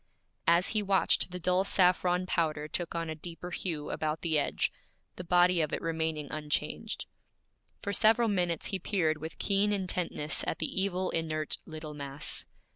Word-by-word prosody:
As 170 +2 +5
he 215 - +1
watched, 195 -2 +3
the 180 - -5
dull 180 +2 +2
saffron 180 -1 +3
powder 155 -4 0
took 170 +2 -2
on 165 0 -1
a 160 - -3
deeper 170 +2 -8
hue 165 -5 -3
about 155 0 -2
the 160 -3 +2
edge, - - 0 0.4
the 180 - -6
body 175 0 +4
of 155 - -1
it - - -1
remaining 160 -2 -2
unchanged. 150 +8 -2 0.8
For 200 - -2
several 225 +4 +5
minutes 175 -5 0
he 190 - +1
peered 160 -7 +1
with 160 +1 -7
keen 200 +1 +2
intentness 180 -6 0
at - - -1
the - - -2 0.2
evil, 185 -1 0
inert 155 -1 -1
little 155 -1 -7
mass. 140 0 -2
170 Hz, 165 wpm, -30 LUFS, 155-185 Hz, 0.8 s, As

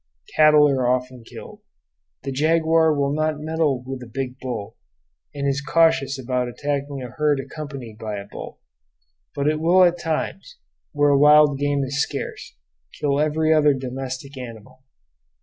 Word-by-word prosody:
Cattle 150 -1 +6
are 130 -3 +1
often 125 -1 -1
killed. - - -12 0.6
The 135 - -4
jaguar 160 +3 +3
will 140 -1 0
not 155 0 -1
meddle 155 -4 -1
with 130 0 -6
a 125 - -10
big 130 0 -5
bull; 125 -6 -6 0.6
and 140 -1 -3
is 140 0 0
cautious 160 -2 +2
about 125 -1 -2
attacking 140 +1 -4
a 125 - -8
herd 150 -2 +1
accompanied 135 -6 -8
by 110 -1 -4
a 100 - -7
bull; - - -10 0.8
but 140 0 -1
it 155 0 +1
will 175 +3 +5
at 175 0 +3
times, 155 -2 -4 0.3
where 145 -1 +3
wild 150 0 +5
game 145 -1 0
is 140 +2 -1
scarce, - - -5 0.4
kill 145 -2 0
every 155 +1 +2
other 150 -2 +4
domestic 130 +1 -6
animal. 125 +1 -11
140 Hz, 150 wpm, -22 LUFS, 130-155 Hz, 0.8 s, Cattle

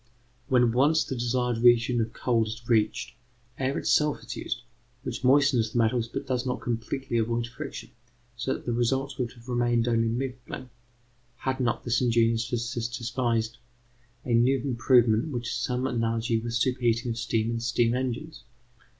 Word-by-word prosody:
When 125 -3 +4
once 145 +6 +3
the - - -5
desired 120 -1 0
region 120 0 +4
of 110 0 -2
cold 115 -3 +1
is 115 +1 -7
reached, 110 0 +1 0.5
air 135 +1 0
itself 150 -1 +2
is - - -6
used, - - -4 0.4
which - - -5
moistens 130 -4 +4
the - - -1
metals 115 0 +2
but - - -5
does 130 -2 -1
not 125 -1 -2
completely 120 +2 -2
avoid 115 +1 0
friction; 135 +5 -8 0.4
so 120 +3 -1
that - - -10
the 120 - -1
results 135 +3 0
would 120 -2 -2
have 120 -1 -17
remained 120 -1 +1
only 115 -1 +2
middling, 125 +1 -4 0.6
had 130 +1 -3
not 120 -3 0
this 120 0 +1
ingenious 115 -1 +2
physicist 120 -1 -2
devised 120 -1 -1 0.7
a 120 - 0
new 125 +4 +4
improvement 120 0 +3
which 120 -2 -3
has - - -2
some 130 0 -1
analogy 115 -2 0
with 115 +1 -5
superheating 120 -1 +1
of 115 - -3
steam 110 +1 0
in 115 - -2
steam 120 0 +1
engines. 130 +4 -3
120 Hz, 165 wpm, -27 LUFS, 115-130 Hz, 0.7 s, When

